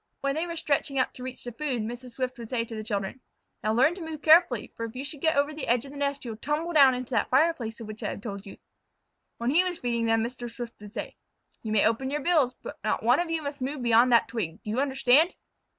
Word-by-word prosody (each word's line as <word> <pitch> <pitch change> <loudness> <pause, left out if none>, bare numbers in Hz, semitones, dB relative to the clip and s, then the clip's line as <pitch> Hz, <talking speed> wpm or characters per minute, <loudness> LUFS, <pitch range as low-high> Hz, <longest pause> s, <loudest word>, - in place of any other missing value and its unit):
When 275 0 0
they 320 +4 -2
were 335 - -5
stretching 290 -3 -1
up 255 - +1
to - - -12
reach 255 0 -7
the 245 - -5
food, 255 -3 -2
Mrs. 240 +2 -7
Swift 255 0 -3
would 230 -2 -8
say 235 -2 0
to 230 - -9
the 215 -1 -5
children: 205 +3 -3 0.4
"Now 215 +1 +1
learn 265 +8 +4
to 365 - -9
move 320 -2 -7
carefully, 315 - +5
for 230 - -5
if 225 +1 -9
you 265 +2 -4
should 285 0 -6
get 320 0 +2
over 285 +2 +2
the 305 - -5
edge 240 +2 +2
of 275 - -10
the 285 - -10
nest 280 -1 -1
you 235 - -4
will 215 - -9
tumble 310 +5 -2
down 275 -4 +7
into 250 +1 -6
that - - +1
fireplace 265 -5 +1
of 230 - -7
which 215 0 -8
I - - -2
have - - -6
told 200 -2 -7
you." - - -10 0.8
When 235 +2 0
he 340 +5 +5
was 360 -2 -2
feeding 235 -2 -1
them 225 0 +3
Mr. 240 0 -5
Swift 235 -1 -8
would 210 0 -12
say: - - -5 0.4
"You 220 - -5
may 215 -2 +4
open 230 +4 +1
your 295 +2 -2
bills, 285 -6 +2
but - - -8
not 215 - 0
one 245 +5 +4
of 345 -1 -1
you 325 -1 -1
must 285 -1 -5
move 265 0 -3
beyond 235 +1 +5
that 235 - +5
twig. 205 -9 -4
Do 210 - -4
you 235 - 0
understand?" 270 +4 +4
255 Hz, 275 wpm, -27 LUFS, 230-290 Hz, 0.8 s, down